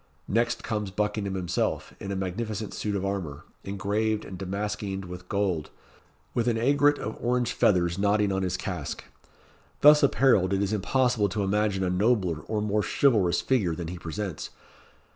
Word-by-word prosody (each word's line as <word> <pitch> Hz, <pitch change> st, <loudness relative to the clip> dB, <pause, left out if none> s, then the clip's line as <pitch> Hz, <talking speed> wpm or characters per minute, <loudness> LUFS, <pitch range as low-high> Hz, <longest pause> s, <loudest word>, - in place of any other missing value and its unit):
Next 120 Hz, +3 st, 0 dB
comes 105 Hz, -2 st, -2 dB
Buckingham 105 Hz, 0 st, -2 dB
himself, 90 Hz, -3 st, -2 dB
in 100 Hz, -, -5 dB
a -, -, -2 dB
magnificent 105 Hz, +3 st, -3 dB
suit 105 Hz, -1 st, -2 dB
of 100 Hz, -1 st, -1 dB
armour, 90 Hz, -5 st, -4 dB, 0.2 s
engraved 105 Hz, +2 st, -1 dB
and 95 Hz, -, -8 dB
damaskeened 100 Hz, +1 st, -3 dB
with 90 Hz, 0 st, -9 dB
gold, 95 Hz, -6 st, 0 dB, 0.6 s
with 120 Hz, -1 st, 0 dB
an 115 Hz, -2 st, +2 dB
aigret 145 Hz, +4 st, +3 dB
of 110 Hz, -, -5 dB
orange 125 Hz, 0 st, +1 dB
feathers 90 Hz, -2 st, +2 dB
nodding 105 Hz, 0 st, +2 dB
on 95 Hz, 0 st, 0 dB
his 95 Hz, 0 st, -1 dB
casque. 90 Hz, -7 st, -5 dB, 0.8 s
Thus 150 Hz, +1 st, +8 dB
apparelled, 125 Hz, -9 st, +4 dB
it 100 Hz, +1 st, +1 dB
is 100 Hz, +1 st, -1 dB
impossible 110 Hz, +1 st, +1 dB
to 100 Hz, +2 st, -1 dB
imagine 100 Hz, -1 st, +1 dB
a 90 Hz, -, 0 dB
nobler 95 Hz, -4 st, +1 dB
or 105 Hz, -1 st, -1 dB
more 105 Hz, 0 st, +1 dB
chivalrous 105 Hz, -9 st, +2 dB
figure 100 Hz, -11 st, +1 dB
than 85 Hz, -1 st, -5 dB
he 90 Hz, 0 st, -6 dB
presents. 90 Hz, 0 st, -5 dB
100 Hz, 160 wpm, -27 LUFS, 95-110 Hz, 0.8 s, Thus